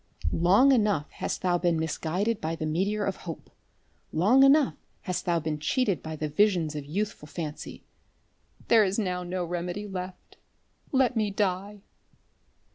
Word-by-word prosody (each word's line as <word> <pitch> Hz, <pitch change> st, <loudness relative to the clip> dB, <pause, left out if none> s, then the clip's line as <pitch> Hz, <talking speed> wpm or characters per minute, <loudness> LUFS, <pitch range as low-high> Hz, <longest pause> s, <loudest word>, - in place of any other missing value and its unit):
Long 195 Hz, +11 st, +5 dB
enough 210 Hz, -, +2 dB
hast -, -, -4 dB
thou 175 Hz, -1 st, +2 dB
been 170 Hz, -2 st, +1 dB
misguided 175 Hz, +7 st, -1 dB
by 160 Hz, +1 st, -2 dB
the 160 Hz, -, -4 dB
meteor 195 Hz, +7 st, 0 dB
of 195 Hz, -, -2 dB
hope. 165 Hz, -3 st, -8 dB, 0.6 s
Long 210 Hz, +12 st, +4 dB
enough 275 Hz, +1 st, +5 dB, 0.3 s
hast 180 Hz, -2 st, -3 dB
thou 170 Hz, -1 st, +2 dB
been 155 Hz, -1 st, -3 dB
cheated 200 Hz, -, 0 dB
by 160 Hz, 0 st, -6 dB
the 155 Hz, 0 st, -3 dB
visions 165 Hz, -1 st, +2 dB
of 145 Hz, -2 st, -5 dB
youthful 195 Hz, -1 st, -3 dB
fancy. 155 Hz, -1 st, -7 dB, 0.8 s
There 225 Hz, -2 st, +6 dB
is 195 Hz, 0 st, 0 dB
now 180 Hz, -4 st, -1 dB
no 180 Hz, 0 st, -3 dB
remedy 175 Hz, +4 st, -4 dB
left. 185 Hz, -1 st, -8 dB, 0.5 s
Let 260 Hz, -2 st, +2 dB
me 215 Hz, -2 st, +1 dB
die." 200 Hz, 0 st, -2 dB
185 Hz, 150 wpm, -27 LUFS, 165-210 Hz, 0.8 s, There